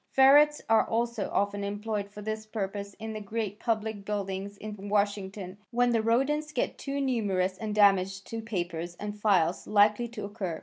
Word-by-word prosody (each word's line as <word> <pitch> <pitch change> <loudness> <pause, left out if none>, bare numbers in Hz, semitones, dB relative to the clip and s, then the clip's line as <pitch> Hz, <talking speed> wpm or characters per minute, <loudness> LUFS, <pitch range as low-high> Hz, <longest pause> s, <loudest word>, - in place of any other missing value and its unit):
Ferrets 290 +3 +6
are 225 0 +5
also 235 -1 -1
often 200 0 0
employed 205 0 -3
for 210 0 -10
this 215 0 -4
purpose 200 -2 -4
in 220 0 -6
the 215 - -5
great 210 0 -4
public 220 -3 -1
buildings 200 -1 -4
in 205 -1 -7
Washington 200 -2 -1
when 245 0 +2
the 230 -1 +2
rodents 275 +7 +1
get - - -2
too 280 0 -3
numerous 200 -8 0
and 215 -2 -3
damage 195 -2 +4
to 225 +3 -5
papers 175 -5 -4
and 210 +2 -6
files 185 -5 +2
likely 210 +3 +4
to 225 -3 -6
occur. 200 -6 -4
210 Hz, 170 wpm, -29 LUFS, 200-225 Hz, -, Ferrets